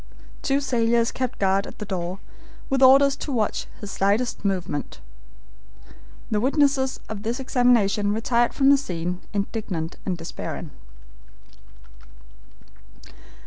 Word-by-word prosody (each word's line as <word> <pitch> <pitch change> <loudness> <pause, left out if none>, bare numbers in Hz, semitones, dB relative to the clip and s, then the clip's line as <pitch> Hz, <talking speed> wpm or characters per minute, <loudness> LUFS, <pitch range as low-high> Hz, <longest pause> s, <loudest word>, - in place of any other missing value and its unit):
Two 275 0 +1
sailors 235 -3 +2
kept 255 -1 -3
guard 195 0 +1
at - - -11
the 210 - -6
door, 185 -2 -3 0.5
with 270 0 +1
orders 275 +1 +7
to 290 - -5
watch 225 -5 -1
his 205 -2 -6
slightest 205 +6 0
movement. 180 -7 -2 1.3
The 210 - +2
witnesses 270 +1 +2
of 215 -2 -6
this 230 +4 -2
examination 235 -6 +2
retired 235 +2 +1
from 275 0 +5
the 280 - +6
scene 180 -7 -4
indignant 200 -5 -3
and 185 -3 -2
despairing. 165 -1 -6
225 Hz, 115 wpm, -24 LUFS, 195-260 Hz, 1.3 s, orders